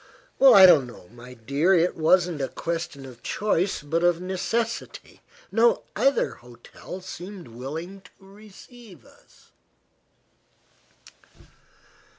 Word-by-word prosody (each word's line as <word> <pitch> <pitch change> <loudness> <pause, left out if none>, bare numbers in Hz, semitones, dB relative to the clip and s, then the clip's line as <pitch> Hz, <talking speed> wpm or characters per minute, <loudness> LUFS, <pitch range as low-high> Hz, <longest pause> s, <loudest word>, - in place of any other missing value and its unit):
"I 200 -8 +9
don't 155 -8 +5
know, 105 -7 -14
my 120 +2 -13
dear. 140 +11 +1
It 175 +1 +1
wasn't 170 -1 +2
a 135 - -1
question 165 -5 -5
of 125 -3 -13
choice, 195 -5 -1
but 165 +4 -2
of 175 -1 +2
necessity. 220 +6 -4 0.3
No 480 0 +2
other 275 0 +1
hotel 120 +9 -12
seemed 185 -2 -10
willing 160 +11 -8
to - - -18
receive 205 - -16
us." - - -24
175 Hz, 110 wpm, -24 LUFS, 140-195 Hz, 0.3 s, I